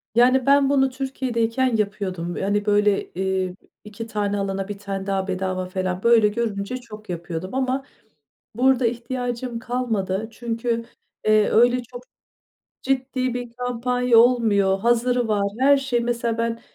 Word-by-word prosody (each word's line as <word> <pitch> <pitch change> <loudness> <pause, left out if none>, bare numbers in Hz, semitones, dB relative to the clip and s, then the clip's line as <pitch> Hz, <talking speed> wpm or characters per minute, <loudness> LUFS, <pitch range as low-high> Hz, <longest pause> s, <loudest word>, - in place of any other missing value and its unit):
Yani 250 +1 +4
ben 280 0 +5
bunu 270 -1 +3
Türkiye'deyken 255 -2 -1
yapıyordum. 190 -5 -2
Hani 205 +1 0
böyle, 205 -1 +2
eee, 190 -1 -2 0.3
2 215 +2 -8
tane 205 -2 -1
alana 195 0 -2
1 205 - -6
tane 195 -1 -5
daha 195 -1 -1
bedava 185 -1 -2
falan, 185 0 -3
böyle 235 -2 +5
görünce 210 +1 -2
çok 215 -4 -12
yapıyordum 175 +4 -5
ama 265 0 0 0.7
burada 255 0 +3
ihtiyacım 245 0 -3
kalmadı. 225 -5 -2
Çünkü, 230 0 -2 0.4
eee, 215 -1 +4
öyle 245 +2 +4
çok 245 +1 -11 0.8
ciddi 260 -1 -1
bir 245 -1 -5
kampanya 250 0 +1
olmuyor. 215 -5 +4
Hazırı 240 +1 +2
var. 210 -2 +1 0.2
Her 280 +1 +5
şey, 270 -3 0
mesela 235 -1 -1
ben 230 0 -1
230 Hz, 135 wpm, -23 LUFS, 200-250 Hz, 0.8 s, ben